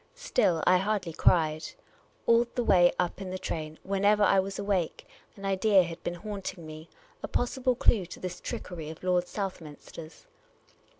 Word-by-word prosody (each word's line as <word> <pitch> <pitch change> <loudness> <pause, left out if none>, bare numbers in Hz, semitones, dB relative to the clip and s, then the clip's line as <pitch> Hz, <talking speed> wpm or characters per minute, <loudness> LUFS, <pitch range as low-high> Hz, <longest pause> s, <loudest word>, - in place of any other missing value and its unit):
Still, 180 - +1
I 185 - +6
hardly 195 -4 -1
cried. 155 -2 +2 0.6
All 235 0 +4
the 245 - 0
way 175 -5 +5
up 180 +2 -1
in 190 - -5
the 185 - -4
train, 155 -3 -5
whenever 200 +2 +2
I 195 -1 +5
was 195 +1 -3
awake, 200 -4 -2 0.3
an 195 - -9
idea 195 0 +4
had 170 0 -7
been 175 - -3
haunting 195 -2 -6
me 155 +1 -10 0.2
— - - -29
a - - -4
possible 255 +1 0
clue 200 -6 +3
to - - -10
this 180 -1 -6
trickery 165 -4 -6
of 160 +2 -10
Lord 180 -1 +1
Southminster's. 165 -5 -7
185 Hz, 170 wpm, -28 LUFS, 170-200 Hz, 0.6 s, I